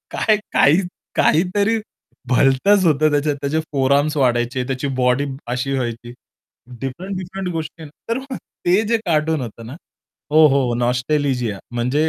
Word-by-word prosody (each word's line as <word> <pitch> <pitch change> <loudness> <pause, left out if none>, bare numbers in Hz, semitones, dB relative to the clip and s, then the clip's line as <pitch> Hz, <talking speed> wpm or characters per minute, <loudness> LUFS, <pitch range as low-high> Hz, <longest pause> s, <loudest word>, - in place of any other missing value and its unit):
काय 215 - +2 0.2
काही 155 +7 +5 0.4
काहीतरी 200 +6 +2 0.5
भलतंच 135 +10 +3
होतं 155 -1 +3
त्याच्यात. 145 0 +1
त्याचे 145 +3 0
फोर 135 -2 +1
आर्म्स 150 +2 0
वाढायचे, 125 -1 +1
त्याची 135 +1 -3 0.2
बॉडी 125 +3 +2 0.3
अशी 130 +2 -2
व्हायची. 120 -2 -4 0.7
डिफरंट-डिफरंट 185 +6 -5
गोष्टी 160 0 -6 0.3
तर 230 - +1
मग 265 -1 -7 0.3
ते 185 +5 +4
जे 230 - +3
कार्टून 160 -2 +1
होतं 115 -2 -7
ना 125 - -8 0.6
हो, 155 0 +7
हो 135 -3 +1
नॉस्टॅलिजिया 125 -2 0 0.2
म्हणजे 125 +6 +1
145 Hz, 135 wpm, -20 LUFS, 125-165 Hz, 0.7 s, हो